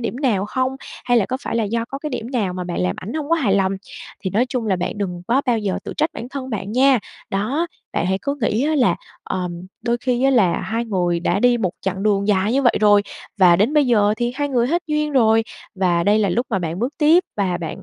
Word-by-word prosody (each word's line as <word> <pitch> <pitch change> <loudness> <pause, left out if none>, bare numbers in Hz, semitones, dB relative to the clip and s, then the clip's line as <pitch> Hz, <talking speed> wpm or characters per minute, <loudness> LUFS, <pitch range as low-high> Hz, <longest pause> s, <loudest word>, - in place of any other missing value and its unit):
điểm 235 +1 -3
nào 235 -9 +1
hông, 260 +3 -1 0.3
hay 245 -1 +3
là 205 - +3
có 260 - -2
phải - - -3
là 225 - +1
do 230 +2 -1
có 275 +3 -7
cái 300 0 -5
điểm 245 0 -5
nào 210 -8 -1
mà 180 0 -4
bạn 175 - -3
làm 90 0 0
ảnh 210 - -6
hổng 305 -2 -3
có 335 - +4
hài 235 -12 +1
lòng, 195 -1 +2 0.5
thì 190 - -3
nói 235 +7 +2
chung 245 -4 -2
là 190 -3 +1
bạn 180 +3 -3
đừng 180 -3 -3
có 265 +4 +3
bao 235 -2 +2
giờ 200 -3 -2
tự - - -5
trách 310 +2 +1
bản 240 - -7
thân 265 -1 -6
bạn 205 -2 -4
nha. 260 0 +4 0.3
Đó, 255 +13 -1 0.3
bạn 170 - 0
hãy 190 +1 0
cứ 280 0 -1
nghĩ 225 +4 +1
á 310 - +1
là, 260 -5 +3 0.3
ừm, 180 -2 -3 0.2
đôi 235 0 +1
khi 245 0 0
á 270 - +5
là 205 -9 +3
hai 230 +2 -2
người 175 -5 0
đã 180 +3 0
đi 245 -1 +4
một 185 -5 0
chặng 190 0 -3
đường 205 -1 +1
dài 205 +2 +2
như 275 +1 +2
vậy 245 - +5
rồi 205 -1 +5 0.4
và 175 -2 +6
đến 215 - +2
bây 295 -3 +4
giờ 210 -3 +3
thì 240 +1 -1
hai 290 +1 -1
người 245 -3 +1
hết 345 +5 0
duyên 300 -1 -1
rồi 225 -3 +4 0.3
và 175 -3 +1
đây 210 +2 +4
là 205 -2 +2
lúc 240 +8 0
mà 195 - +1
bạn 170 0 -4
bước 250 +6 -1
tiếp 325 +4 +5
và 185 -3 0
bạn, 175 +3 -6
225 Hz, 265 wpm, -20 LUFS, 190-260 Hz, 0.5 s, và